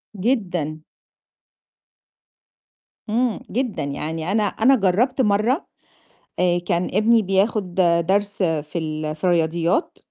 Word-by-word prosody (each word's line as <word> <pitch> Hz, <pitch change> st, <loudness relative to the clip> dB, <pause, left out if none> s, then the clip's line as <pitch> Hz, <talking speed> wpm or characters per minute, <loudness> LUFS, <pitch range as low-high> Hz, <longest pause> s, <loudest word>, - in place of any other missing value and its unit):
جدًا. 180 Hz, -, -1 dB, 2.3 s
إمم، 230 Hz, -2 st, 0 dB
جدًا، 245 Hz, -, -2 dB
يعني 160 Hz, +4 st, -4 dB
أنا 215 Hz, +1 st, +2 dB
أنا 225 Hz, +6 st, +3 dB
جرّبت 240 Hz, +6 st, +1 dB
مرّة 220 Hz, -, +1 dB, 0.7 s
آآ 175 Hz, -1 st, +2 dB
كان 175 Hz, 0 st, -1 dB
ابني 220 Hz, +3 st, +4 dB
بياخُد 195 Hz, -1 st, 0 dB, 0.3 s
درس 200 Hz, +1 st, +1 dB
في 160 Hz, -1 st, -2 dB
ال 155 Hz, -1 st, -3 dB
في 155 Hz, -, -25 dB
الرياضيات 170 Hz, -, +1 dB
190 Hz, 100 wpm, -22 LUFS, 165-220 Hz, 2.3 s, ابني